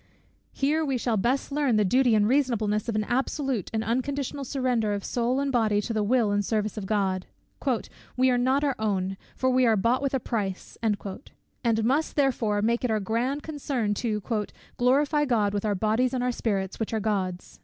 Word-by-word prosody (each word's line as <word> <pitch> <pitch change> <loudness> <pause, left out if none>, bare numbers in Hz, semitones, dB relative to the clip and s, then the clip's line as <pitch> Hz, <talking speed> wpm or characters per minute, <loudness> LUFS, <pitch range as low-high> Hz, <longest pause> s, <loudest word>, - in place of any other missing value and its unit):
Here 300 +4 +1
we 275 -4 0
shall 235 -1 0
best 245 +8 0
learn 280 -4 +1
the 210 -1 +3
duty 250 +3 +4
and 210 -1 +3
reasonableness 230 -5 +1
of 225 - -1
an 215 - +1
absolute 265 - -1
and 220 -1 -1
unconditional 275 +4 -2
surrender 250 -5 0
of 200 - -5
soul 245 +2 0
and 280 0 0
body 220 -4 +2
to 220 +3 -3
the 215 - 0
will 220 0 +2
and 205 0 +1
service 215 0 -1
of 205 -3 -5
God. 190 -3 0 0.9
"We 260 0 +4
are 245 - +2
not 260 +3 +2
our 280 -2 +2
own; 195 -3 -1 0.2
for 260 0 +1
we 255 0 +3
are 220 -1 +4
bought 235 +6 +2
with 275 -1 0
a - - +1
price," 200 -6 -3
and 215 -3 +1 0.9
must 285 +6 +1
"therefore" 230 -7 +1
make 235 +3 +1
it 250 - +1
our 220 -1 +1
grand 240 +8 -1
concern 275 -8 -2
to 215 -4 -1 0.5
"glorify 285 +4 +3
God 215 -6 +1
with 205 +1 -2
our 205 -1 +1
bodies 220 +6 +1
and 250 - -1
our 250 - +1
spirits, 195 -5 -2
which 225 0 -2
are - - +1
God's." 190 -4 -3
235 Hz, 195 wpm, -26 LUFS, 210-260 Hz, 0.9 s, duty